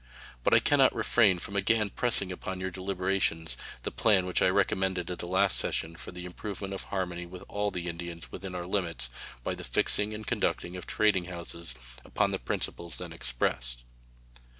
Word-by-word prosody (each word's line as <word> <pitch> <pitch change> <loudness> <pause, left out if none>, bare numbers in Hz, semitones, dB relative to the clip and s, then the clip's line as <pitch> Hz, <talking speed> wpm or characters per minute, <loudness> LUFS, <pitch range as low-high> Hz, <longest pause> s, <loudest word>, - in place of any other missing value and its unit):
But - - +5
I - - +8
can 145 - +3
not 135 - +6
refrain 110 -4 +4
from 100 +3 -6
again 105 +1 +2
pressing 105 -6 +2
upon 95 +1 -4
your 95 0 -2
deliberations 95 -3 0 0.3
the - - -2
plan 100 -5 +4
which 90 - +1
I - - +6
recommended 95 -2 +1
at 90 - -4
the 85 - -3
last 95 +2 +3
session 80 +1 0
for - - -7
the 90 0 -7
improvement 100 +2 -5
of 95 - -4
harmony 90 -2 -3
with 90 +1 -9
all 105 0 0
the 90 -3 -4
Indians 85 0 -6
within 95 -2 -6
our 90 -1 -3
limits 85 -10 -1 0.3
by - - -1
the - - -7
fixing 105 +1 +2
and 110 0 -7
conducting 85 -2 0
of 90 - -7
trading 105 -4 +3
houses 85 -5 -6 0.3
upon - - +1
the - - -1
principles 85 +6 -3
then - - -6
expressed. - - 0
90 Hz, 185 wpm, -30 LUFS, 85-100 Hz, 0.3 s, I